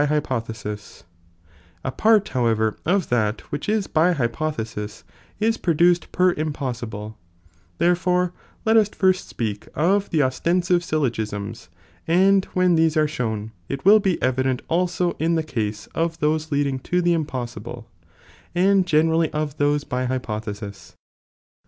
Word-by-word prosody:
hypothesis, 115 -8 -3 0.8
A 130 - -2
part 215 - +3
however 110 -3 +1
of 185 0 +1
that 110 -2 +1
which 145 +7 -3
is 215 -2 +1
by 175 +1 +3
hypothesis 115 -6 -3 0.4
is 225 +1 +2
produced 175 +1 +2
per 180 0 +3
impossibile, 120 -9 -4 0.6
therefore 180 - +2 0.3
let 220 0 +5
us 215 -2 +4
fii 190 -2 +3
st - - -9
speak 105 -3 -4
of 195 +6 +2
the 160 - +2
oslensive 175 +7 +1
(syllogisms), 110 - -3 0.4
and 190 +3 +4
when 185 -1 +4
these 160 -1 +3
Bre 155 -1 +4
shown, 110 -7 -3 0.2
it 140 +2 -4
will 210 +2 +8
be 190 -4 0
evident 130 0 0
also 180 +1 +1
in 165 +2 +1
the 160 - +1
case 110 -8 -3
of 165 0 -1
those 155 +1 0
lead 145 0 +2
ing 135 -1 -2
to 180 +7 -1
the 175 -1 +3
impossibile, 120 -6 -4 0.7
and 190 +1 +3
genei 160 -1 +3
ally 165 -1 +2
of 150 -1 -2
those 145 0 +2
by 125 -2 -2
hypothesis, 105 -5 -5
a. - - -43
150 Hz, 145 wpm, -23 LUFS, 120-175 Hz, 0.8 s, will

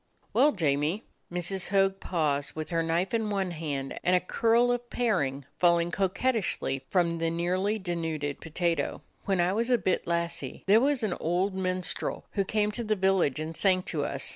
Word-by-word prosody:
"Well, 300 - +5
Jamie 155 +3 0
— - - -44
" - - -41
Mrs. 180 +1 -1
Hogg 195 0 +2
paused 145 -5 -1
with 155 +1 -5
her 165 -1 +1
knife 165 +5 0
in 225 -2 0
one 195 -3 -1
hand, 145 -5 -4
and 180 - +4
a - - +5
curl 230 +6 +2
of 245 0 -2
paring 145 - 0
falling 170 -1 +3
coquettishly 190 - 0
from 170 -3 +1
the 165 0 +1
nearly 185 +5 0
denuded 165 -6 -3
potato. 165 +1 -1 0.2
"When 195 -2 +1
I 175 +2 +2
was 230 +4 0
a 245 - +5
bit 190 - -1
lassie, 170 -5 -2
there 210 +4 +6
was 275 -2 +1
an 205 -5 +1
old 180 +4 0
minstrel 185 -1 -2
who 200 - 0
came 210 +1 0
to 235 +3 -3
the 215 -1 +1
village 190 -8 +2
and 160 +1 -4
sang 185 0 +2
to 150 -5 -2
us. - - -2
180 Hz, 190 wpm, -28 LUFS, 165-205 Hz, 0.2 s, there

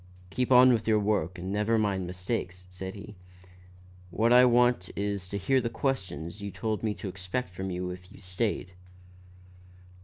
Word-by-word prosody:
"Keep 125 +3 -1
on 125 0 +8
with 115 -2 -1
your 110 -1 +4
work 100 -4 0
and 90 +2 -5
never 105 +2 +2
mind 100 -4 0
mistakes," 90 0 -4
said 95 +2 -6
he. 105 +1 -9 1.0
"What 115 +6 +2
I 125 +1 +8
want 120 -5 +3
is 100 -2 -2
to 100 - -3
hear 130 +7 +2
the 115 - -2
questions 95 - -3
you 100 - -4
told 105 +3 -3
me 110 -2 -1
to 95 +3 -6
expect 95 +3 -4
from 95 +1 -4
you 90 0 -3
if 90 0 -11
you - - -14
stayed." 90 0 -2
100 Hz, 175 wpm, -28 LUFS, 90-115 Hz, 1.0 s, on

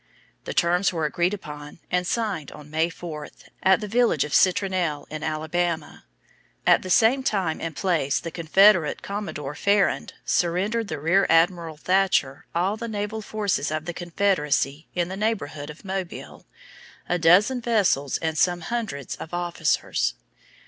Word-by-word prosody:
The - - -4
terms 175 +2 +3
were 165 -3 -1
agreed 175 +6 0
upon 150 -5 -10
and 180 0 +1
signed 200 - -2
on 150 0 -12
May 160 +2 +1
4, 165 -3 -7 0.3
at 190 +2 +4
the 210 - -4
village 230 - +2
of 150 - -6
Citronelle 180 -5 +2
in 155 0 -5
Alabama. 160 - -2 0.6
At - - +5
the 185 - -7
same 230 +8 +4
time 195 -10 -1
and 165 -2 -4
place 160 -5 +1
the 165 - -6
Confederate 175 +1 +4
Commodore 195 -9 -5
Farrand 200 +5 +1
surrendered 200 +6 0
to 155 -5 -4
Rear 180 +6 +3
Admiral 165 -1 +2
Thatcher 180 -6 +1
all 190 +5 +1
the 235 +1 -5
naval 215 0 -3
forces 205 -8 -1
Of 155 +1 -3
the 175 - -4
Confederacy 165 -5 0
in 175 -1 0
the 190 - -5
neighborhood 175 -9 -2
of 150 +6 -11
Mobile 190 -2 -6 0.6
a 180 - 0
dozen 200 +10 +4
vessels 200 - +1
and 160 -1 -2
some 175 -1 +2
hundreds 200 - -4
of 165 - -7
officers. 170 - 0
175 Hz, 150 wpm, -24 LUFS, 155-200 Hz, 0.6 s, At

